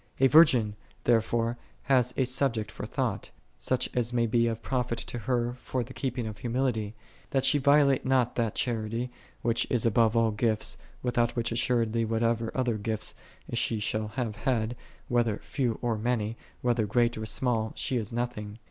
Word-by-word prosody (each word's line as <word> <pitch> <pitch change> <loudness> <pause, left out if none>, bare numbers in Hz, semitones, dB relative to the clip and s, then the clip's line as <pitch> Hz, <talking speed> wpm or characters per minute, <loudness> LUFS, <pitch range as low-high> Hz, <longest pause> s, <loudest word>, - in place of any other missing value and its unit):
A 135 - +5
virgin, 125 -7 +6 0.3
therefore, 115 0 +1 0.2
hath 125 -2 +2
a 130 - +3
subject 125 -4 +1
for - - -6
thought, - - -2 0.3
such 130 - +1
as 120 -1 +1
may 120 -1 +2
be 115 +1 +2
of 115 0 -3
profit 125 -2 -1
to 120 +1 -4
her 120 +1 0
for 130 -2 -2
the 125 +3 -11
keeping 125 -3 -3
of 105 -2 -6
humility, 115 -3 -1 0.3
that 135 -1 +1
she 145 +2 +5
violate 140 -1 +4
not 130 -2 +2
that 115 -3 0
charity, 115 0 -1 0.3
which 115 0 +1
is 120 -3 +1
above 115 0 +3
all 115 -1 +3
gifts, 110 0 0 0.3
without 120 -1 +1
which 120 -1 -1
as 115 - 0
suredly 115 -2 +1
whatever 115 0 0
other 120 -4 0
gifts 110 0 -3 0.4
she 115 -1 0
shall 110 +1 -1
have 115 -5 -2
had, 120 -3 0 0.3
whether 120 -3 +1
few 125 -5 -1
or 115 -3 0
many, 115 -1 -1 0.3
whether 120 -3 +1
great 120 +2 +2
or 110 0 -5
small, 115 -2 0
she 130 - -1
is 110 -4 -2
nothing. 115 -3 -4
120 Hz, 175 wpm, -28 LUFS, 110-125 Hz, 0.4 s, virgin